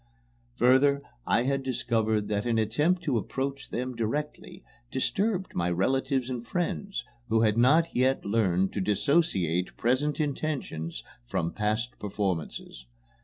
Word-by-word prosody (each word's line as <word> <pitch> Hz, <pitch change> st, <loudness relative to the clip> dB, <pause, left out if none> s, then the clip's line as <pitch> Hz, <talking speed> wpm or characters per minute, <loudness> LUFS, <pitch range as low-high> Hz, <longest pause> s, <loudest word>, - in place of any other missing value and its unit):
Further, 140 Hz, +3 st, +4 dB, 0.2 s
I 120 Hz, -, +3 dB
had 135 Hz, +1 st, 0 dB
discovered 110 Hz, -5 st, 0 dB
that 105 Hz, +2 st, -1 dB
an 115 Hz, -1 st, +2 dB
attempt 150 Hz, -, +1 dB
to 130 Hz, -7 st, +1 dB
approach 135 Hz, +4 st, -4 dB
them 125 Hz, +1 st, -3 dB
directly 150 Hz, -, -4 dB, 0.3 s
disturbed 190 Hz, -, 0 dB
my 85 Hz, 0 st, 0 dB
relatives 130 Hz, -, +1 dB
and 125 Hz, -2 st, -4 dB
friends, 175 Hz, -, -3 dB, 0.2 s
who 110 Hz, 0 st, +3 dB
had 110 Hz, -2 st, +3 dB
not 150 Hz, +8 st, +4 dB
yet 130 Hz, +2 st, +2 dB
learned 95 Hz, -3 st, +1 dB
to 100 Hz, -, -1 dB
dissociate! 100 Hz, -, +1 dB
present 135 Hz, +6 st, +1 dB
intentions 135 Hz, -, -3 dB, 0.2 s
from 85 Hz, +6 st, -1 dB
past 110 Hz, +3 st, -1 dB
performances. 95 Hz, -, -3 dB
125 Hz, 125 wpm, -28 LUFS, 105-140 Hz, 0.3 s, Further